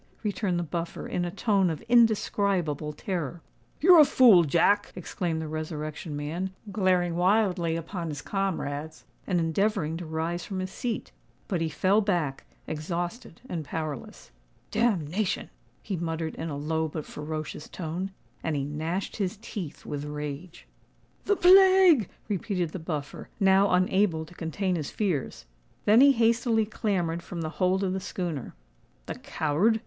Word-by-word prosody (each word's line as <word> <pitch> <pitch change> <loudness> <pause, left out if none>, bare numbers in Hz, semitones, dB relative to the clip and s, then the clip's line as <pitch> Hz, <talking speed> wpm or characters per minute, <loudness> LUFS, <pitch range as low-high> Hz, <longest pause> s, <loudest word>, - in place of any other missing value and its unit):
returned 200 -3 -1
the 175 - 0
Buffer, 170 +1 -4
in 175 - -1
a - - -2
tone 195 -1 +2
of 160 - -3
indescribable 200 - +2
terror. 170 0 -4 0.4
"You're 350 +1 +8
a - - +11
fool, 235 -10 +7
Jack!" 190 +7 +3
exclaimed 175 -2 -3
the 160 - -4
Resurrection 155 0 -5
Man, 170 +6 -4 0.2
glaring 185 -3 +2
wildly 180 -2 +2
upon 165 +1 -4
his 145 -2 -5
comrades, 160 -6 -3 0.2
and 180 -3 +1
endeavouring 165 0 0
to 170 -1 -7
rise 165 +2 -2
from 195 - -5
his 185 0 -4
seat. 235 +3 -4 0.4
But 180 -6 -1
he 165 - 0
fell 190 +8 +2
back, 170 -9 -1 0.2
exhausted 170 +5 -4
and 165 -8 -3
powerless. 150 -2 -6 0.4
"Damnation!" 195 -3 0 0.3
he 195 - -3
muttered 165 -1 -3
in 165 - -5
a 145 - -4
low 160 +2 -1
but 155 0 -5
ferocious 155 0 -6
tone; 180 +3 -4 0.3
and 160 -2 -1
he 140 - -1
gnashed 160 +6 -3
his 200 0 -2
teeth 200 -8 -7
with 145 -1 -4
rage. 150 +3 -6 0.6
"The 410 - +3
plague!" 370 - +7 0.2
repeated 185 -4 -1
the 185 - -5
Buffer, 155 -3 -5
now 195 0 +5
unable 180 -2 +2
to 175 - -15
contain 180 +2 -2
his 150 -3 -4
fears. 175 - -2 0.4
Then 215 +4 +6
he 280 0 +8
hastily 230 -1 +2
clambered 180 -6 -1
from 170 -1 -6
the 160 - -2
hold 185 +2 +3
of 185 -1 0
the 190 - -1
schooner. 175 -7 -4 0.5
"The - - -6
coward!" 175 +10 +1
175 Hz, 150 wpm, -27 LUFS, 160-200 Hz, 0.6 s, a